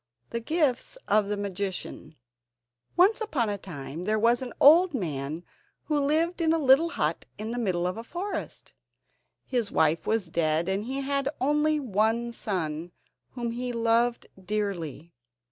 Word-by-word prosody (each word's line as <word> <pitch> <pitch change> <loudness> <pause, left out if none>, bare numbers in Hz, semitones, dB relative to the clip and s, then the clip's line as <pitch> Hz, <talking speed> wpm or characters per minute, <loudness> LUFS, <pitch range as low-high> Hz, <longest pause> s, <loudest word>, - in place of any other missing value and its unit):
] 120 0 -48
The 235 - -1
Gifts 295 - 0
Of 210 -1 +3
The 205 0 -2
Magician 195 -4 -5 0.8
Once 405 +6 +5
upon 275 - 0
a 205 -1 -3
time 160 -3 -7
there 215 +4 0
was 235 +3 +3
an 255 -2 -5
old 330 +3 +7
man 155 - -3 0.4
who 300 -2 0
lived 320 +5 +1
in 320 -1 +3
a - - +2
little 290 +2 +5
hut - - -1
in 215 +2 -5
the 245 - -3
middle 180 -6 0
of 180 +3 -2
a 225 - -5
forest. 360 - -5 0.7
His 240 -5 -1
wife 160 +1 +2
was 220 -3 +1
dead, 160 0 +1
and 195 +2 -1
he 270 +3 -3
had 275 0 0
only 300 +3 +2
one 230 -1 0
son, 175 -6 -3 0.4
whom 240 -2 -3
he 245 +1 -3
loved 235 +1 +1 0.2
dearly. 175 -6 -3
230 Hz, 160 wpm, -27 LUFS, 185-275 Hz, 0.8 s, old